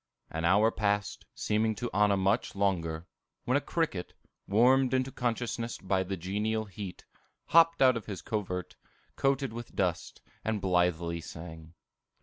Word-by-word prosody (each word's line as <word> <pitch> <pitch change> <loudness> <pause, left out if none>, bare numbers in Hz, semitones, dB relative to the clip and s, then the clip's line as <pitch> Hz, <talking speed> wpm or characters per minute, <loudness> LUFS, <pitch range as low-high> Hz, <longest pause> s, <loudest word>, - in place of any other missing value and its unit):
An 80 +1 -2
hour 105 +6 +5
passed, 105 -1 -1
seeming 110 +1 +1
to 120 +3 -3
Anna 105 -1 +3
much 95 +1 +1
longer, 85 -5 0 0.4
when - - +2
a - - +3
cricket, - - -2 0.3
warmed 130 +5 +4
into 130 +1 0
consciousness 120 -1 -2
by 95 0 0
the 95 +1 -3
genial 105 +5 -1
heat, 95 -2 -8 0.4
hopped 165 -3 +5
out 130 -1 +6
of 115 - -5
his 95 -5 -6
covert, 90 -5 -3 0.4
coated 135 -2 +1
with 120 0 -8
dust, 90 -3 -1 0.2
and 110 -1 -1
blithely 90 -3 +1
sang. 80 0 -10
100 Hz, 140 wpm, -30 LUFS, 90-115 Hz, 0.4 s, out